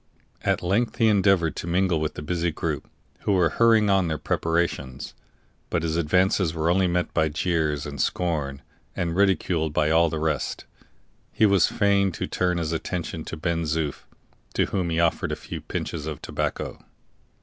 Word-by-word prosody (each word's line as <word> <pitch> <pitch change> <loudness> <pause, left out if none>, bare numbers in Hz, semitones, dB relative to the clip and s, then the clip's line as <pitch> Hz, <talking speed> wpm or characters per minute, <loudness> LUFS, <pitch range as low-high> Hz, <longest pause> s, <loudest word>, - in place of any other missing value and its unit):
At - - 0
length 110 +6 0
he 115 - +4
endeavored 95 -6 +3
to - - -5
mingle 90 -2 +1
with 75 - -2
the - - -6
busy 85 +2 0
group, - - -3 0.3
who 100 - 0
were 90 -3 +3
hurrying 115 -2 +4
on 95 -2 +3
their 80 -1 -1
preparations; 80 -6 -2 0.6
but 85 - -1
his 80 -1 -1
advances 85 +1 +2
were 80 +1 +1
only 95 +1 +3
met 90 0 -1
by 80 -1 +2
jeers 75 -2 0
and 70 -1 -4
scorn, 75 -6 -1 0.3
and, 85 -1 -1
ridiculed 90 -5 +1
by 75 0 +2
all 85 +1 +4
the 80 - -3
rest, 75 -1 -2 0.7
he 110 - +3
was 100 -3 +4
fain 100 -1 +2
to - - -3
turn 90 -1 0
his 80 -2 -2
attention 80 -1 -3
to 80 - -6
Ben 85 +1 -1
Zoof, 75 -2 -2 0.5
to - - +3
whom 90 -3 -2
he 80 0 0
offered 85 -1 +1
a - - -1
few - - -7
pinches 80 -2 -4
of 75 -3 -5
tobacco. - - -3
85 Hz, 175 wpm, -25 LUFS, 80-95 Hz, 0.7 s, he